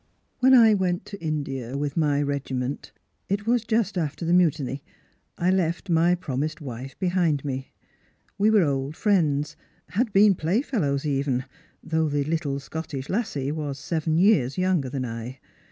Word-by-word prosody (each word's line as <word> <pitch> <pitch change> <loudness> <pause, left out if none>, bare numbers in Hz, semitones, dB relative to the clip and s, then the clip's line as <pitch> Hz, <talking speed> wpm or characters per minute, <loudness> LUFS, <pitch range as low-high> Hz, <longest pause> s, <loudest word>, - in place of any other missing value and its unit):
"When 260 +1 +6
I 225 -3 +7
went 185 -3 0
to 200 -4 -9
India 135 -5 -3
with 145 0 -2
my 145 -3 +2
regiment 135 -2 -3 0.2
— - - -47
it 200 +1 -1
was 235 0 +2
just 220 -4 0
after 150 0 -3
the 170 - +2
Mutiny 150 -6 +1 0.3
— - - -44
I - - +5
left 180 0 0
my 170 +2 +4
promised 155 -1 -3
wife 130 -2 -7
behind 175 -6 +1
me. 135 -1 -4 0.6
We 205 +2 +3
were 215 -4 +5
old 140 0 -1
friends, 155 -9 +1 0.3
had 220 +4 0
been 200 +1 +6
playfellows 165 - 0
even, 135 -3 0 0.4
though 160 -1 0
the 145 0 0
little 150 -2 -2
Scottish 140 -2 -6
lassie 150 - -1
was 150 -3 -4
seven 160 +2 -1
years 170 - +3
younger 185 -7 +1
than 130 -1 -3
I. 115 +2 -6
155 Hz, 160 wpm, -25 LUFS, 140-185 Hz, 0.6 s, I